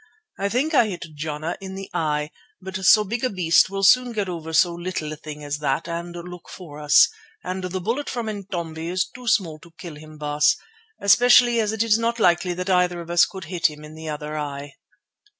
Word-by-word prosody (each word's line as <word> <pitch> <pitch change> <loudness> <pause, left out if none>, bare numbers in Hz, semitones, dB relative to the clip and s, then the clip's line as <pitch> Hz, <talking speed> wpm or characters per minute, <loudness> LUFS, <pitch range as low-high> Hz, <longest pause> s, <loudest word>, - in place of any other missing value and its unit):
I 200 +1 0
think 270 +9 0
I 245 -6 +5
hit 180 -3 -5
Jana 155 +2 -4
in 190 0 -7
the 195 0 -7
eye, 150 -1 -1 0.3
but 190 0 -8
so 210 +3 +6
big 230 +4 -4
a 255 - +2
beast 175 -4 +3
will 195 0 -4
soon 245 +5 +5
get 205 -3 -2
over 165 -3 -6
so 170 +2 +3
little 170 -3 -4
a - - -6
thing 150 0 -9
as 145 0 -4
that 135 -3 -1
and 170 +1 -5
look 175 0 -9
for 150 -5 -10
us, 150 -1 +6 0.4
and 185 0 -4
the 185 +1 -3
bullet 230 +10 -2
from 240 -2 -3
Intombi 175 -6 -5
is 185 +1 0
too 250 -1 -13
small 165 -8 +1
to 170 - -16
kill 165 -1 -8
him, 155 0 -13
Baas, 150 0 +2 0.4
especially 240 +3 +5
as 215 -2 +1
it 220 0 0
is 225 -1 +3
not 230 +1 0
likely 175 -2 +2
that 180 +1 -4
either 180 -1 +2
of 170 0 -7
us 175 0 +5
could 190 -2 -9
hit 170 +1 +1
him 150 0 -12
in 150 0 -11
the 160 0 -8
other 150 0 -5
eye." 145 -1 -5
175 Hz, 220 wpm, -23 LUFS, 155-200 Hz, 0.4 s, so